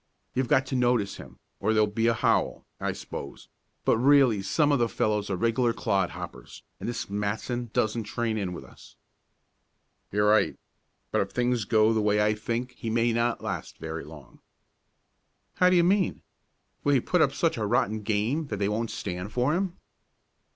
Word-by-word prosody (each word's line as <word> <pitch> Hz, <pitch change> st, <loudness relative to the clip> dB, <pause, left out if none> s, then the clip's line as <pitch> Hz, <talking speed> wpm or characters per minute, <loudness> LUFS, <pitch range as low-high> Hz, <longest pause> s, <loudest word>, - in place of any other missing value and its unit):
You've 130 Hz, -1 st, 0 dB
got 130 Hz, +3 st, +3 dB
to 130 Hz, -, -4 dB
notice 120 Hz, -5 st, +1 dB
him, 65 Hz, -1 st, -12 dB, 0.2 s
or 110 Hz, +3 st, +1 dB
there'd 105 Hz, -1 st, +2 dB
be 115 Hz, +1 st, +1 dB
a 115 Hz, -, +3 dB
howl, -, -, +1 dB
I -, -, -1 dB
s'pose; 70 Hz, -, -8 dB, 0.4 s
but 115 Hz, -, +3 dB
really 130 Hz, -5 st, +5 dB
some 150 Hz, +9 st, +2 dB
of 140 Hz, -, +3 dB
the 120 Hz, -1 st, +2 dB
fellows 105 Hz, -2 st, 0 dB
are 95 Hz, -, 0 dB
regular 115 Hz, +3 st, +1 dB
clod 100 Hz, -5 st, 0 dB
hoppers, -, -, -9 dB, 0.2 s
and -, -, -4 dB
this 120 Hz, -, -4 dB
Matson 105 Hz, +4 st, -3 dB
doesn't 110 Hz, 0 st, 0 dB
train 115 Hz, +1 st, -2 dB
in 100 Hz, -4 st, -2 dB
with 85 Hz, -, -7 dB
us." -, -, -16 dB, 1.2 s
"You're 105 Hz, +1 st, +2 dB
right. 110 Hz, -, +3 dB, 0.5 s
But -, -, +2 dB
if 100 Hz, -, -2 dB
things 120 Hz, -2 st, 0 dB
go 110 Hz, +1 st, +4 dB
the 110 Hz, -, +1 dB
way 105 Hz, 0 st, +2 dB
I 105 Hz, 0 st, +3 dB
think 115 Hz, +4 st, -3 dB
he 115 Hz, -, -3 dB
may 115 Hz, +1 st, +2 dB
not 115 Hz, 0 st, 0 dB
last -, -, -5 dB
very 80 Hz, 0 st, -5 dB
long." 75 Hz, -5 st, -13 dB, 1.2 s
"How 180 Hz, -, +5 dB
do 185 Hz, -, +4 dB
you 175 Hz, -, +5 dB
mean? 190 Hz, +1 st, +1 dB, 0.6 s
Will 145 Hz, -1 st, +3 dB
he -, -, +5 dB
put -, -, +1 dB
up -, -, +4 dB
such -, -, 0 dB
a -, -, -1 dB
rotten 110 Hz, +1 st, +1 dB
game 110 Hz, +9 st, 0 dB
that 105 Hz, -, -4 dB
they 100 Hz, 0 st, 0 dB
won't 115 Hz, +2 st, -1 dB
stand 90 Hz, +1 st, -5 dB
for 125 Hz, +6 st, +1 dB
him?" 185 Hz, 0 st, -1 dB
115 Hz, 185 wpm, -27 LUFS, 105-125 Hz, 1.2 s, really